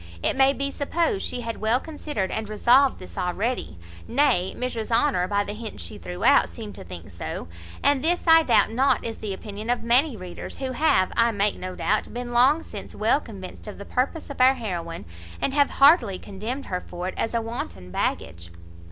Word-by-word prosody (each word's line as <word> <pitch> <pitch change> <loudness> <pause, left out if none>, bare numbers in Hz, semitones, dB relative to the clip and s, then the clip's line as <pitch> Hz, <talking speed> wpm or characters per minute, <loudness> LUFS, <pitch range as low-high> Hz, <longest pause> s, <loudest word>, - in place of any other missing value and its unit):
It - - +2
may 270 0 +5
be 275 0 -2
supposed 335 +7 -1
she 245 - -2
had 230 -2 -5
well 225 +3 +3
considered 295 -10 -4
and 220 -1 -3
resolved 250 +6 +4
this 185 - -9
already; 195 - -2 0.3
nay, 230 -9 +2
Mrs 240 -3 -3
Honour, 230 -6 +2
by 205 +1 +1
the 205 - -6
hints 215 - -7
she 85 - -8
threw 90 0 -7
out, - - +5
seemed - - -8
to - - -9
think - - -10
so; 85 - -6 0.4
and 285 -2 +3
this 350 +2 +1
I 325 -1 +8
doubt 315 - +3
not 265 +4 +2
is 225 -1 -4
the 210 - -4
opinion 210 +3 -6
of 245 - 0
many 245 +2 +3
readers, 180 -2 -8
who 265 -1 -3
have, 255 -9 +2
I 230 0 +4
make 205 -2 +1
no 185 0 -6
doubt, 215 +2 0
been 245 0 -4
long 265 +7 +4
since 205 - -9
well 225 +7 +2
convinced 195 -4 -10
of 210 - -7
the 200 - -9
purpose 280 +7 -2
of 275 - -4
our 260 +1 +6
heroine, 175 -8 -5 0.3
and 270 - -1
have 285 -1 +3
heartily 275 - +5
condemned 220 +9 -6
her 180 -1 -3
for 175 +1 -6
it 185 - -4
as 225 - -2
a - - +3
wanton 160 - -6
baggage. 85 -1 -3
230 Hz, 205 wpm, -25 LUFS, 195-270 Hz, 0.4 s, I